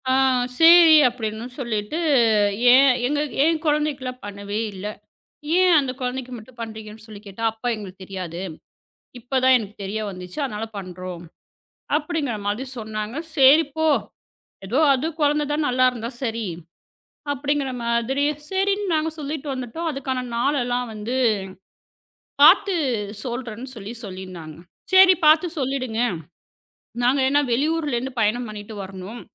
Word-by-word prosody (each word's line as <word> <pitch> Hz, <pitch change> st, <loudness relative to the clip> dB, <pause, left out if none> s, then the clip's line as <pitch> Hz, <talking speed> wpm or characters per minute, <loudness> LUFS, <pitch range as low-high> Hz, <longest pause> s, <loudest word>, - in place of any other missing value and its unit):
ஆ -, -, +3 dB, 0.5 s
சேரி 330 Hz, -1 st, +8 dB
அப்டின்னு 225 Hz, -2 st, -4 dB
சொல்லிட்டு, 220 Hz, +1 st, -3 dB, 0.8 s
ஏன் 270 Hz, +2 st, +7 dB, 0.2 s
எங்க 290 Hz, +2 st, 0 dB, 0.2 s
என் 320 Hz, 0 st, +2 dB
கொழந்தைக்குல்லாம் 295 Hz, -4 st, -1 dB
பண்ணவே 200 Hz, +1 st, -5 dB
இல்ல. 195 Hz, +2 st, -6 dB, 0.7 s
ஏன் 370 Hz, -1 st, +5 dB
அந்தக் 265 Hz, -2 st, -2 dB
கொழந்தைக்கு 255 Hz, 0 st, -4 dB
மட்டும் 235 Hz, +2 st, -14 dB
பண்றீங்கன்னு 220 Hz, -1 st, -8 dB
சொல்லிக் 215 Hz, -1 st, -12 dB
கேட்டா, 200 Hz, +3 st, -9 dB
"அப்ப 225 Hz, +2 st, -9 dB
எங்களுக்குத் 195 Hz, -3 st, -9 dB
தெரியாது. 180 Hz, -3 st, -6 dB, 0.8 s
இப்பதான் 260 Hz, +2 st, +3 dB
எனக்குத் 210 Hz, -3 st, -5 dB
தெரிய 205 Hz, +3 st, -3 dB
வந்துச்சு. 180 Hz, +2 st, -9 dB
அதனால 220 Hz, -4 st, -4 dB
பண்றோம்." 180 Hz, -2 st, -7 dB, 0.7 s
அப்டிங்கற 300 Hz, -6 st, -2 dB
மாதிரி 210 Hz, +6 st, -2 dB
சொன்னாங்க. 215 Hz, +1 st, -5 dB, 0.2 s
"சேரி 280 Hz, +3 st, +7 dB
போ. 315 Hz, 0 st, +1 dB, 0.8 s
எதோ 235 Hz, +8 st, 0 dB, 0.2 s
அது 270 Hz, +4 st, -1 dB
கொழந்தை 295 Hz, 0 st, +2 dB
தான் 300 Hz, 0 st, 0 dB
நல்லா 255 Hz, +1 st, +2 dB
இருந்தா 235 Hz, -1 st, -5 dB
சரி" 225 Hz, -2 st, -2 dB, 0.9 s
அப்படிங்கற 280 Hz, 0 st, -1 dB
மாதிரி 235 Hz, +4 st, 0 dB, 0.3 s
சரின்னு 390 Hz, 0 st, 0 dB
நாங்க 315 Hz, 0 st, +1 dB
சொல்லிட்டு 300 Hz, 0 st, -5 dB
வந்துட்டோம். 260 Hz, +6 st, -5 dB
அதுக்கான 265 Hz, -2 st, -3 dB
நாள் 275 Hz, +5 st, +1 dB
எல்லாம் 245 Hz, 0 st, -2 dB
வந்து 215 Hz, +4 st, -4 dB, 1.3 s
பாத்து 390 Hz, +5 st, +6 dB, 0.5 s
சொல்றேன்னு 245 Hz, 0 st, -6 dB
சொல்லிச் 225 Hz, +2 st, -8 dB
சொல்லிருந்தாங்க. 185 Hz, -5 st, -9 dB, 0.4 s
"சரி 375 Hz, 0 st, +8 dB
பாத்து 310 Hz, +4 st, +6 dB
சொல்லிடுங்க. 255 Hz, -4 st, -2 dB, 1.0 s
நாங்க 255 Hz, +3 st, +3 dB
என்ன 285 Hz, +1 st, +3 dB
வெளியூர்ல 300 Hz, +2 st, 0 dB
இருந்து 255 Hz, +1 st, -5 dB
பயணம் 235 Hz, +3 st, 0 dB
பண்ணிட்டு 210 Hz, +1 st, -8 dB
வரணும்." 195 Hz, +4 st, -9 dB
250 Hz, 125 wpm, -22 LUFS, 215-290 Hz, 1.3 s, சேரி